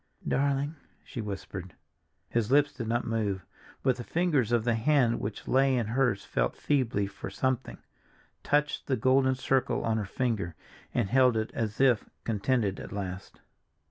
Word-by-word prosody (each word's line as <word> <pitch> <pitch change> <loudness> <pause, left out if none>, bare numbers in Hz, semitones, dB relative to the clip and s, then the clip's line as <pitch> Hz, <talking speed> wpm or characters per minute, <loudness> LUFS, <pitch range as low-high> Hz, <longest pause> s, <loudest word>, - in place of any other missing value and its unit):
"Darling," 140 +2 0 0.3
she 120 - -6
whispered. 95 -3 -6 0.5
His 115 0 -1
lips 145 +1 +4
did 115 - -5
not 120 +2 0
move, 105 -5 -1 0.4
but 130 -2 +2
the 120 - -5
fingers 150 -7 +1
of 120 -2 +3
the 120 0 +2
hand 120 0 +3
which 100 +1 -5
lay 135 0 +3
in 120 - 0
hers 115 -2 +1
felt - - 0
feebly 125 -8 +1
for 100 - -7
something—touched 145 +3 -3
the 130 - +1
golden 130 +2 +3
circle 130 0 +1
on 110 -1 +1
her 105 - -1
finger, 105 -7 -1 0.4
and 110 -6 0
held 130 -2 +5
it 110 0 -1
as 110 -2 -3
if 125 -5 +3
contented 105 -2 0
at - - -8
last. 95 -1 -6
120 Hz, 155 wpm, -29 LUFS, 105-135 Hz, 0.5 s, held